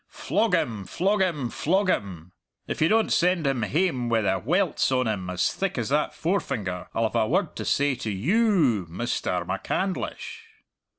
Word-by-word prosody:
Flog 215 -3 0
him, 110 - -2
flog 195 - 0
him, 150 -10 0
flog 190 +5 +1
him! 90 - -2 0.4
If - - -4
you 160 - +5
don't 220 +4 +2
send 180 -2 +2
him 135 -3 +1
hame 130 - 0
wi' 115 -1 +2
the 100 - 0
welts 175 - +1
on 130 -1 +2
him 100 -5 -2
as 90 -1 0
thick 195 -5 -2
as 115 -2 -2
that 150 +2 0
forefinger, 105 - -2
I'll 115 - +1
have 110 - -1
a 110 -2 +2
word - - 0
to - - -4
say 145 0 +2
to 115 - -5
you 170 - +2
ou, 130 - +2
Misterr 90 -2 -2
MacCandlish!" 190 - -3
135 Hz, 180 wpm, -25 LUFS, -, 0.4 s, you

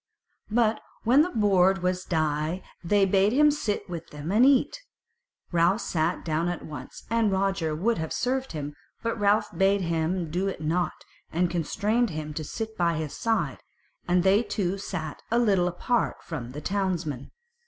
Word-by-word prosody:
But 220 0 +2 0.2
when 255 +6 +5
the 345 - +2
board 195 - +3
was 185 0 0
dight 155 +2 -1 0.2
they 200 +3 +3
bade 195 +5 +3
them 300 0 +7
sit 225 -8 -2
down - - -13
with 170 -1 -6
them 150 +3 -6
and 220 +5 +5
eat. 280 - +3 0.7
Ralph 175 +5 +3
sat 165 +1 -1
down 165 +1 0
at 175 - -4
once, 150 - -9
and 230 -3 +2
Roger 190 -5 0
would 210 +5 0
have 160 0 -3
served 260 -1 -1
him, 145 -1 -4 0.3
but 230 0 -2
Ralph 205 +1 +2
bade 195 +1 +3
him 165 0 -1
do 185 +4 0
it 195 - -3
not, 160 +2 -1 0.3
and 175 +1 +1
constrained 210 +8 0
him 155 -2 -5
to 155 - -4
sit 220 +8 -5
by 170 -3 +1
his 155 -2 -4
side, 225 -1 0 0.5
and 175 0 +3
they 195 +3 +5
two 195 -5 -2
sat 160 -6 -5
a 235 - +2
little 200 -7 +3
apart 230 +7 -1
from 130 -7 -6
the 150 - -6
townsmen. 180 -9 -2
185 Hz, 175 wpm, -27 LUFS, 160-215 Hz, 0.7 s, them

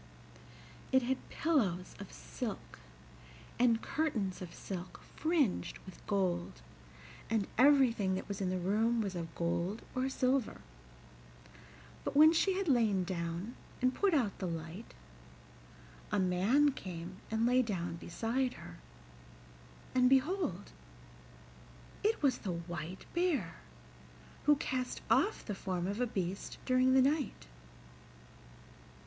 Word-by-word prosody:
It 260 -1 +4
had 260 +2 -2
pillows 205 - 0
of - - -8
silk, - - -6 0.8
and 235 -2 +3
curtains 220 - -1
of 180 -2 -6
silk 185 -2 -7 0.2
fringed 315 - +1
with 185 - -12
gold, 175 - -1 0.7
and 220 -2 +1
everything 245 -7 +4
that 190 - -5
was 200 0 -4
in 185 - 0
the 185 - 0
room 215 +6 +1
was 200 -3 -1
of 170 -2 -6
gold 170 +5 -1
or 260 +1 0
silver, 260 -2 0 1.4
but - - -3
when 310 +2 +8
she 385 +3 +3
had 390 -2 -1
lain 225 -9 +3
down 175 +4 -3 0.3
and 255 0 +2
put 390 +1 +2
out 235 -9 0
the 185 - -2
light 165 +5 -6 1.2
a - - +1
man 200 +11 +3
came 180 -6 -7
and 225 +1 +1
lay 250 +1 +4
down 175 -7 -3
beside 235 +9 -1
her, 85 - -10 1.2
and 250 -1 +5
behold 275 - +1 1.3
it 430 -5 +1
was 265 -3 +3
the 185 - -3
White 170 +1 -6
Bear, 300 - 0 0.9
who 295 +1 +6
cast 255 -3 -2
off 430 - +3
the 210 - -3
form 185 -2 -3
of 205 +5 -2
a 250 - +2
beast 190 -3 -3
during 255 0 +4
the 260 - +6
night. 280 - 0
215 Hz, 125 wpm, -33 LUFS, 180-260 Hz, 1.4 s, when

